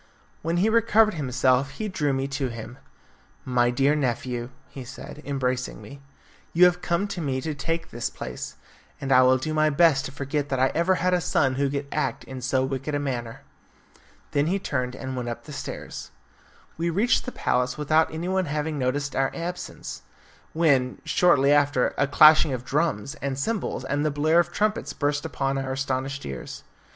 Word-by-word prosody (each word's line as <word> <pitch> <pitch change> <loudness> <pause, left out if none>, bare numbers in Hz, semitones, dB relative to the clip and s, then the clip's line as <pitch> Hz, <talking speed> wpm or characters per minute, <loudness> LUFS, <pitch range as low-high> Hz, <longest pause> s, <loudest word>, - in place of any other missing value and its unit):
When 165 +2 -1
he 190 +5 +3
recovered 225 -1 +4
himself 130 -2 +1
he 215 - -2
drew 155 -8 0
me 135 0 -1
to 140 -1 -2
him. 115 +1 -8 0.7
"My 125 -1 +2
dear 135 +4 +2
nephew," 125 -3 -2 0.2
he 135 - -9
said, 135 +3 -10
embracing 130 -2 -2
me, 140 0 -11 0.5
"you 175 +2 +7
have 180 0 +3
come 175 +3 0
to 180 - -4
me 135 -4 -1
to 155 +1 -3
take 165 +3 -3
his 120 0 -3
place, 65 -1 -7 0.4
and 135 - -3
I 130 -1 +7
will 130 0 +5
do 155 +4 -3
my 155 0 +3
best 150 -2 +4
to - - -5
forget 140 +1 -3
that 130 - -1
I 130 +1 +4
ever 170 +3 +2
had 180 +1 +1
a 180 - +2
son 135 -4 +2
who 140 +1 0
could 140 +1 -3
act 150 - -1
in 130 -1 -8
so 130 +1 +1
wicked 135 +2 -3
a - - 0
manner." 120 -5 -4 0.9
Then 145 +1 +1
he 190 +4 +1
turned 125 -9 -2
and 130 0 -5
went 125 -1 -3
up 120 - -6
the 150 - -10
stairs. - - -7 0.7
We 170 +1 0
reached 205 +9 +2
the 255 - -4
palace 125 - 0
without 155 +2 +2
anyone 180 +4 -1
having 150 0 -2
noticed 140 +2 -1
our 135 0 +2
absence, 175 +1 -6 0.5
when, 140 -6 +2
shortly 145 -6 +4
after, 145 -3 +3
a 140 - +3
clashing 155 0 +6
of 125 0 -5
drums, 140 -5 0
and 135 -1 -2
cymbals, 210 +8 -2
and 145 +1 -1
the 155 - +2
blare 155 +3 +3
of 175 0 +1
trumpets 210 +3 -1
burst 145 +1 -1
upon 135 -2 -1
our 130 0 -3
astonished 135 +1 -2
ears. 65 -2 -7
140 Hz, 185 wpm, -25 LUFS, 130-160 Hz, 0.9 s, you